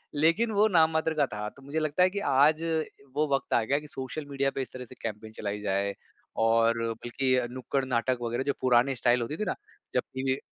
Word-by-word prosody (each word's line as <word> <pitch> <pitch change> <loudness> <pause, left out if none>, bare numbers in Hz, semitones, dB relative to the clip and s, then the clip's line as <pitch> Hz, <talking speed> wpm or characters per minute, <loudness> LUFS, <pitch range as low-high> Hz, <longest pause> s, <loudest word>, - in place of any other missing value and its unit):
लेकिन 170 +10 +3
वो 210 +1 +4
नाम 165 -5 +4
मात्र 160 0 +1
का 150 -2 +2
था, 105 -4 -5
तो 140 - -18
मुझे 140 +4 -3
लगता 155 +3 +2
है 185 - +5
कि 200 - -3
आज 150 +4 +4 0.5
वो 150 +1 +2
वक़्त 135 - -3
आ 115 - +4
गया 140 +6 +1
कि 150 - -12
सोशल 135 +3 -6
मीडिया 140 0 +1
पे 135 - -3
इस - - -6
तरह 125 -1 -7
से 125 - -13
कैंपेन 110 0 -5
चलाई 105 -1 -4
जाए 100 0 0 0.5
और 115 0 +3
बल्कि 130 +3 -1
अ, 125 -1 +1
नुक्कड़-नाटक 130 -1 -1
वगैरह 120 +2 -1
जो 140 +1 0
पुराने 130 +1 +3
स्टाइल 120 0 +3
होती 145 +7 -3
थी - - -1
ना - - -3 0.4
जब - - +3
भी 130 0 0
130 Hz, 225 wpm, -28 LUFS, 120-150 Hz, 0.5 s, है